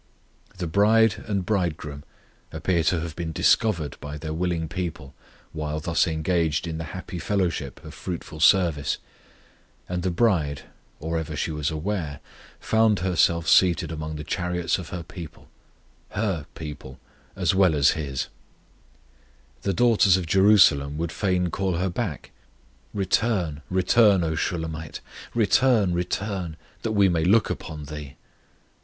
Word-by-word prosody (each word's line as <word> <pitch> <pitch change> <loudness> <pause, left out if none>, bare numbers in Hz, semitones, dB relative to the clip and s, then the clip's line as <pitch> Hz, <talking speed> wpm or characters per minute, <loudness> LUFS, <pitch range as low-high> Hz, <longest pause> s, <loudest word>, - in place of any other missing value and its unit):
The 90 - -3
bride 105 +5 +3
and 100 -4 -1
Bridegroom 85 -8 -2 0.5
appear 90 -3 0
to 90 -3 +2
have 80 -1 -6
been 85 -2 -4
discovered 80 - +2
by 75 +1 -6
their 80 +1 -5
willing 85 -1 -1
people 85 -6 -5 0.4
while 75 -1 -3
thus 85 +3 +1
engaged 80 -1 0
in 80 -1 -4
the 80 - -4
happy 95 -1 -6
fellowship 85 -8 -2
of 75 - -9
fruitful 85 -3 -6
service, 80 -5 +3 0.9
and 90 -1 -2
the 95 - 0
bride, 85 - +1 0.4
or 80 +1 -2
ever 80 -1 -5
she 80 - -2
was 75 -1 -1
aware, 80 -3 -3 0.4
found 110 -3 +2
herself 85 -2 +2
seated 85 -2 +4
among 80 0 -5
the 75 - -5
chariots 90 +2 -1
of 90 - -8
her 90 -2 -5
people 85 -2 -10 0.6
her 95 -8 -2
people 75 -4 -8 0.4
as 95 -3 +1
well 95 -4 +4
as 70 -2 +5
His. 70 -4 -3 1.4
The 100 - 0
daughters 105 -3 +4
of 90 - -3
Jerusalem 90 -7 +5
would 85 0 -2
fain 90 -3 0
call 95 0 -1
her 90 +2 -1
back: 90 -5 -4 0.6
Return, 95 -5 0
return, 95 +1 +4
O 80 -1 0
Shulammite; 80 -2 -3 0.4
Return, 115 -3 +3
return, 90 -1 -3 0.2
that 110 - -2
we 100 -2 +5
may 85 -3 +1
look 105 +5 +3
upon 75 -2 -6
thee. 75 -3 -8
85 Hz, 140 wpm, -25 LUFS, 80-95 Hz, 1.4 s, as